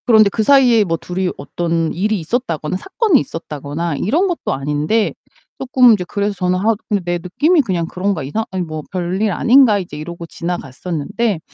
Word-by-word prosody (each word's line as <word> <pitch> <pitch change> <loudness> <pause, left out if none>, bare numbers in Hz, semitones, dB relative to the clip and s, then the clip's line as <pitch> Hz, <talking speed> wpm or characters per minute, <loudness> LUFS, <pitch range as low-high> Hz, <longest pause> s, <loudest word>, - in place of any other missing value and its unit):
그런데 220 -3 +6
그 220 +2 -1
사이에 245 -3 +5
뭐 165 -4 -1
둘이 180 +2 -3
어떤 165 +2 -2
일이 210 +4 0
있었다거나 170 - -2
사건이 385 - +2
있었다거나 150 -1 -4
이런 310 - +1
것도 350 - -2
아닌데 150 +10 0 0.5
쪼끔 255 -2 +5
이제 195 -4 0
그래서 205 +1 -1
저는 180 -1 0
하 220 +4 +2 0.3
'내 175 0 -1
느낌이 300 - +2
그냥 185 -9 -1
그런가? 180 -1 -2
이상 215 +12 -2
아니 185 -1 -2
뭐 155 -2 -5
별일 185 +3 -1
아닌가?' 235 +1 +5
이제 180 -6 -6
이러고 170 +3 -7
지나갔었는데 170 - -3
185 Hz, 385 characters per minute, -18 LUFS, 165-225 Hz, 0.5 s, 그런데